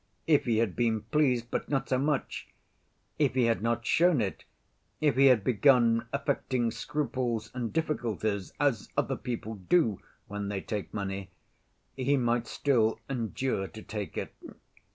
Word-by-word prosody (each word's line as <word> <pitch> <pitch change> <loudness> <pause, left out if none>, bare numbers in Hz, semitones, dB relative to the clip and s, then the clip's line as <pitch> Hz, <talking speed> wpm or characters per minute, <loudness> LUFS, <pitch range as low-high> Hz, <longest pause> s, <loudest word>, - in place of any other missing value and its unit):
If 150 -3 +3
he 115 -3 +2
had 110 -4 +1
been 115 -2 +1
pleased, 125 0 +1
but - - -2
not 135 -2 0
so 130 - +1
much; 145 0 -1 0.7
if 140 -4 +2
he 130 - +3
had 115 -2 +2
not 115 +1 0
shown 170 -1 +4
it; 100 -4 -3 0.5
if 150 -3 +2
he 135 +1 +6
had 125 -6 +5
begun 120 -1 +4
affecting 130 -4 0
scruples 120 -6 -2
and 120 -3 -3
difficulties, 110 - -1
as 135 -7 +1
other - - +1
people 115 -2 -5
do 110 - +1 0.3
when 105 0 -4
they 100 -1 -2
take 105 0 -4
money, 100 -2 -4 0.7
he 135 +2 +1
might 120 -2 +1
still 115 -6 +1
endure 120 -4 -2
to 110 +2 -11
take 105 -2 -5
it. - - -4
120 Hz, 155 wpm, -29 LUFS, 110-135 Hz, 0.7 s, he